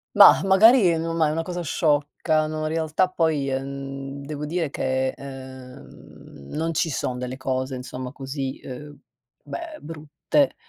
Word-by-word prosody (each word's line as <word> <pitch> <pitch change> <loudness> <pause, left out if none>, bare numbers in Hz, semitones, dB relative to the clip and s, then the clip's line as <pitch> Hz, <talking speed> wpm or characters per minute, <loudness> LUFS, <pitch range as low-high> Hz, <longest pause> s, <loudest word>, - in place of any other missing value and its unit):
mah, - - +9
magari 195 -2 +6
non 165 +1 -2
ma 160 -2 +3
è - - 0
una 165 +1 -1
cosa 175 +1 -4
sciocca, 155 0 +1
no, 155 0 -4
in 155 - -1
realtà 160 +3 +1
poi, 160 -6 +1
ehm, 135 +1 -5
devo 150 0 -5
dire 165 0 -1
che, 130 -1 0
uhm, 130 - -11
non 165 +2 -1
ci 160 +1 +1
son 125 -3 -2
delle 125 +1 -4
cose 130 0 -2
insomma 125 0 -6
così, 135 -1 -5
uhm, 145 +3 -9 0.5
beh 335 -2 -7
brutte, 155 - -1
145 Hz, 150 wpm, -24 LUFS, 130-165 Hz, 0.5 s, mah